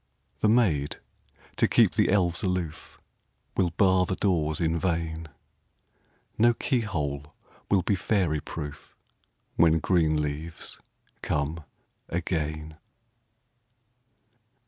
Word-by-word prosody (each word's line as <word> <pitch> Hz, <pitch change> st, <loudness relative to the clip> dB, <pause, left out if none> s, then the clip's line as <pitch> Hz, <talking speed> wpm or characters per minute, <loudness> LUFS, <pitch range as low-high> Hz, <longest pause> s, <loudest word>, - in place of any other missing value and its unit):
The 105 Hz, -, +3 dB
maids, 90 Hz, -, +2 dB, 0.6 s
to -, -, +4 dB
keep -, -, +4 dB
the -, -, +2 dB
elves 90 Hz, -1 st, +2 dB
aloof, 90 Hz, -5 st, -3 dB, 0.6 s
Will 90 Hz, -3 st, +2 dB
bar 95 Hz, +1 st, +3 dB
the 95 Hz, -, -1 dB
doors 80 Hz, -7 st, +1 dB
in 85 Hz, 0 st, +1 dB
vain; 80 Hz, -2 st, -2 dB, 1.1 s
No 120 Hz, +1 st, +5 dB
key 130 Hz, 0 st, 0 dB
hole 75 Hz, -9 st, -3 dB, 0.3 s
will 95 Hz, -3 st, +3 dB
be -, -, +1 dB
fairy 90 Hz, -4 st, +1 dB
proof, 75 Hz, -1 st, -8 dB, 0.6 s
When 80 Hz, 0 st, +5 dB
green 80 Hz, -2 st, +2 dB
leaves 75 Hz, +2 st, -4 dB, 0.4 s
come 75 Hz, +2 st, -2 dB, 0.5 s
again. 80 Hz, -3 st, -3 dB
85 Hz, 100 wpm, -27 LUFS, 75-95 Hz, 1.1 s, No